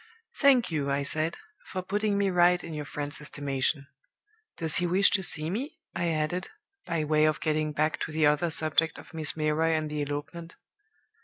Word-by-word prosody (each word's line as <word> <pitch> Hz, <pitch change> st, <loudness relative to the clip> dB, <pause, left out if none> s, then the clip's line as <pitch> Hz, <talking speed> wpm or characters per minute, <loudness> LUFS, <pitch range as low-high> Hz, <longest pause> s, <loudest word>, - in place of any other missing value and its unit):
"'Thank 265 Hz, -, +5 dB
you,' 145 Hz, -3 st, -1 dB
I 140 Hz, 0 st, 0 dB
said, 155 Hz, +3 st, 0 dB, 0.3 s
'for 185 Hz, -1 st, -4 dB
putting 205 Hz, +2 st, 0 dB
me 200 Hz, -1 st, +2 dB
right 180 Hz, 0 st, +4 dB
in 165 Hz, -, -7 dB
your 150 Hz, -1 st, -4 dB
friend's 145 Hz, 0 st, -4 dB
estimation. 140 Hz, -1 st, -2 dB, 0.7 s
Does 160 Hz, -3 st, +2 dB
he 175 Hz, -, +1 dB
wish 190 Hz, +3 st, +4 dB
to 195 Hz, -, +3 dB
see 155 Hz, -4 st, 0 dB
me?' 255 Hz, -, -4 dB, 0.2 s
I 170 Hz, 0 st, -1 dB
added, 160 Hz, +2 st, -1 dB, 0.4 s
by 165 Hz, -2 st, 0 dB
way 155 Hz, 0 st, +3 dB
of 155 Hz, 0 st, +1 dB
getting 155 Hz, -1 st, 0 dB
back 155 Hz, +1 st, 0 dB
to -, -, -3 dB
the 155 Hz, 0 st, +2 dB
other 150 Hz, +3 st, +3 dB
subject 160 Hz, 0 st, +1 dB
of -, -, -13 dB
Miss 160 Hz, -1 st, 0 dB
Milroy 155 Hz, +1 st, +1 dB
and 155 Hz, -1 st, -1 dB
the 150 Hz, -1 st, -2 dB
elopement. 145 Hz, +4 st, -5 dB
155 Hz, 185 wpm, -28 LUFS, 150-175 Hz, 0.7 s, Thank